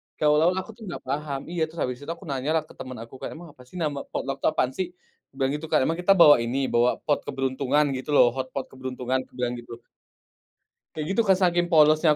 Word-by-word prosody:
Kayak 150 - +2
awal-awal 165 +5 +4
aku 225 - -11
tuh 235 - -21
enggak 175 - -6
paham, 140 0 -2
iya 175 - -3
terus 160 +1 -11
abis 125 0 -3
itu 150 - -5
aku - - -14
nanyalah 150 +4 0
ke - - -13
temen 130 -1 -7
aku, 115 - -15
kayak, - - -5
"Emang 170 0 -11
apa - - -18
sih - - -17
nama 150 -4 -1
potluck 135 0 -3
itu - - +1
apaan 130 -3 0
sih?" 185 -2 -1 0.4
aku - - -64
bilang 135 0 +1
gitu, 150 - -5
Kak, - - +4
"Emang 165 +4 0
kita 195 +2 +5
bawa 150 -4 +9
ini 120 +4 -1
bawa 120 +1 +4 0.2
pot 145 -2 +2
keberuntungan, 135 +2 +1
gitu 130 +3 -8
loh, 120 -3 +6
hotpot 130 0 -4
keberuntungan?" 130 0 -3
aku - - -34
bilang 125 0 -1
gitu. 120 -1 -10 1.2
Kayak 155 -1 -3
gitu 230 - +3
Kak, 190 - +6
saking 175 -1 +2
polosnya 155 -1 +5
145 Hz, 230 wpm, -25 LUFS, 130-160 Hz, 1.2 s, bawa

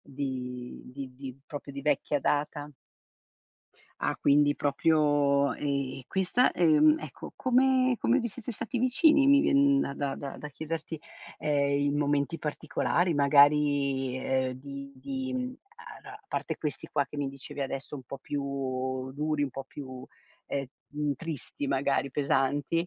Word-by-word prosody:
di 125 -3 -5
di 130 0 -8
di 135 -1 -8
proprio 145 -1 -7
di 140 0 -6
vecchia 145 0 +1
data. 145 +1 -1 1.3
Ah, - - -1
quindi 145 0 +4
proprio 145 -1 +2
e 140 -3 -2
questa, 190 +7 +2
ehm, 155 -3 +5
ecco, 155 -4 -9
come 255 0 +3
come 255 - +3
vi 235 -2 -1
siete 240 +2 -6
stati 245 +2 -3
vicini? 275 +4 +4
Mi 280 0 +7
viene 280 -1 +4
da 140 - -1
da 140 -1 -2
da 140 -1 -6
da 150 - -6
chiederti, 160 +2 -5 0.4
ehm, 140 -1 +1
in 145 - 0
momenti 145 +2 +1
particolari, 160 +3 0
magari, 140 -2 +4
ehm, 130 0 0
di 140 0 -8
di 260 - -4 0.2
a 465 - -11
a - - -12
parte - - -3
questi 150 -2 -4
qua 145 -2 +1
che 140 - -10
mi 140 -1 -1
dicevi 135 +1 -9
adesso 135 +1 -4
un 135 - -7
po' 135 - -7
più 145 +2 -4 0.7
duri, 150 +1 -1
un 140 - -1
po' 135 +1 -6
più, 130 -2 -9 0.4
ehm, 140 -1 -2 0.5
tristi 155 -2 -5
magari, 140 0 +1
pesanti, 145 +4 +1
145 Hz, 145 wpm, -29 LUFS, 140-165 Hz, 1.3 s, Mi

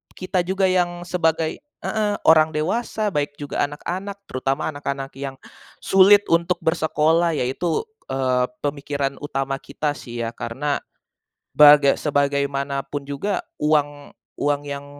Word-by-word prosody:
kita 185 0 -2
juga, 190 +1 0
yang 175 -1 0
sebagai 165 -2 0
heeh, 220 -7 -3
orang 155 0 +5
dewasa, 210 +6 -1
baik 145 -2 -2
juga 145 0 -2
anak-anak, 190 +7 -6
terutama 135 +4 -1
anak-anak 140 -1 -5
yang 135 -1 -5 0.5
sulit 200 +2 +6
untuk 170 +2 +3
bersekolah. 160 0 +2
Ya - - 0
itu, 160 - -1 0.2
eee, 130 -1 +1 0.2
pemikiran 140 -1 -2
utama 135 -2 -3
kita, 150 +1 -3
sih 120 -4 -6
ya. 115 - -3
Karena, 130 +5 -3 0.8
baga 145 -1 +8
sebagaimanapun 140 -1 -1
juga, 160 +8 -2 0.2
uang 145 -1 0 0.3
uang 145 0 +1
yang 140 0 -6
145 Hz, 125 wpm, -22 LUFS, 140-175 Hz, 0.8 s, baga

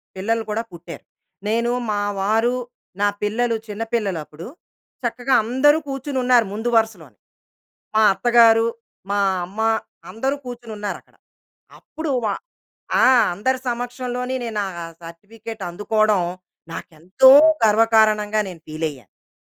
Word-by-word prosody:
పిల్లలు 225 +4 -1
కూడా 225 +2 -1
పుట్టారు. 170 0 -10 0.4
నేను, 235 +2 +1 0.2
మా 205 -1 -1 0.2
వారు, 225 +5 +1 0.5
నా 205 - +4
పిల్లలు 230 +3 0
చిన్న 210 +2 -4
పిల్లలు 200 -7 0
అప్పుడు. 155 +4 -11 0.6
చక్కగా 245 +3 -1
అందరూ 265 +6 +3
కూర్చొని 270 0 -4
ఉన్నారు 245 -3 +4
ముందు 225 +3 -2
వరుసలోనే. 180 - -2 0.8
మా 220 - +4
అత్తగారు, 230 0 +5 0.4
మా 205 - +1 0.3
అమ్మ 195 +5 -8 0.5
అందరూ 265 +5 -2
కూర్చొని 240 -2 -8
ఉన్నారు 205 -1 -4
అక్కడ. - - -31 0.6
అప్పుడు 315 -2 -6
వ - - +1 0.8
ఆ! - - +5 0.3
అందరి 260 +8 -1
సమక్షంలోనే 245 +1 -3
నేనా 215 -3 -2 0.4
సర్టిఫికేట్ 205 +7 -10
అందుకోవడం, 210 +1 +1 0.5
నాకేంతో 175 +10 +2 0.3
గర్వకారణంగా 215 -1 +3
నేను 175 -4 -10
ఫీల్ 155 +1 -3
అయ్యాను. 130 - -14
అది. - - -92
220 Hz, 120 wpm, -21 LUFS, 205-240 Hz, 0.8 s, అత్తగారు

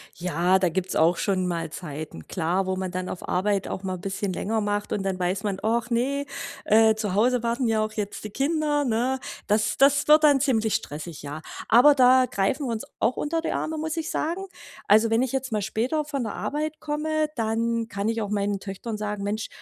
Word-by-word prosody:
Ja, 180 +2 +2
da 185 - +2
gibt's 185 +2 -2
auch 165 +3 +4
schon 185 -1 0
mal 165 -2 -2
Zeiten, 150 - -7
klar, 180 +3 0
wo 190 0 -1
man 185 -1 -3
dann 185 0 -3
auf 180 - -6
Arbeit 195 +1 0
auch 190 - -5
mal 185 -1 -2
'n 180 - -10
bisschen 195 0 -3
länger 220 +5 -1
macht 205 0 -2
und 195 - -1
dann 190 -1 -1
weiß 185 +2 -1
man: 200 -2 -1
„Och 230 +2 0
ne, 270 +4 0 0.4
äh, 220 +1 +5
zu 210 -3 -2
Hause 240 +3 +2
warten 235 +2 0
ja 220 -2 +2
auch 215 0 -4
jetzt 205 -1 -4
die - - -4
Kinder“, 295 +4 0
ne? 250 +1 0 0.3
Das 215 0 +1
das 280 +1 +4
wird 305 0 +7
dann 285 -3 +5
ziemlich 225 -6 +2
stressig, 155 +2 -5
ja. 145 +2 -6 0.3
Aber 265 +6 +7
da 255 -1 +6
greifen 245 +7 0
wir 235 - -1
uns 220 - -4 0.2
auch 235 +3 +2
unter 325 +2 -1
die - - -2
Arme, 315 0 -2
muss 315 +1 -3
ich 325 -1 -3
sagen. 355 +5 -2 0.4
Also, 220 +2 +5
wenn 225 +1 +3
ich 260 -2 0
jetzt 265 -3 -2
mal 210 - 0
später 235 +9 -1
von 285 -4 -3
der 215 - -4
Arbeit 305 +1 -3
komme, 310 0 -1
dann 230 +1 0
kann 200 0 -2
ich 230 0 -1
auch 205 - -3
meinen 200 -1 -1
Töchtern 205 +3 -6
sagen: 210 -1 -3
„Mensch, 215 +2 -2
220 Hz, 220 wpm, -25 LUFS, 195-265 Hz, 0.4 s, wird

